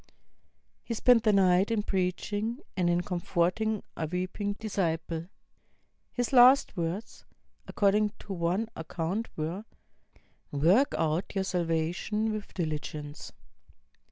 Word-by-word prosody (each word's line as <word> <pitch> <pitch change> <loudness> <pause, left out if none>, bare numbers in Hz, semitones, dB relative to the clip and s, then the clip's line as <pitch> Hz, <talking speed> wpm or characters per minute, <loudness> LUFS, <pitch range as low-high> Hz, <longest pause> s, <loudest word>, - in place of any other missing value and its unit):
He 230 - -4
spent 245 +1 +5
the 215 - +3
night 190 -1 +4
in 220 -2 0
preaching, 205 +4 -1 0.2
and 180 -2 +1
in 175 0 +2
comforting 180 +4 -1
a 160 - -2
weeping 185 +4 -2
disciple. 170 -6 -2 0.8
His 245 +1 -2
last 255 +1 +7
words, 175 +4 -4 0.4
according 210 0 +2
to 200 - -6
one 180 +5 0
account, 170 +7 -3
were, 165 +6 -3 0.9
''Work 175 - +3
out 160 +4 -1
your 195 - +1
salvation 180 +5 -1
with 215 -1 -6
diligence." 150 -3 -4
185 Hz, 110 wpm, -29 LUFS, 170-215 Hz, 0.9 s, last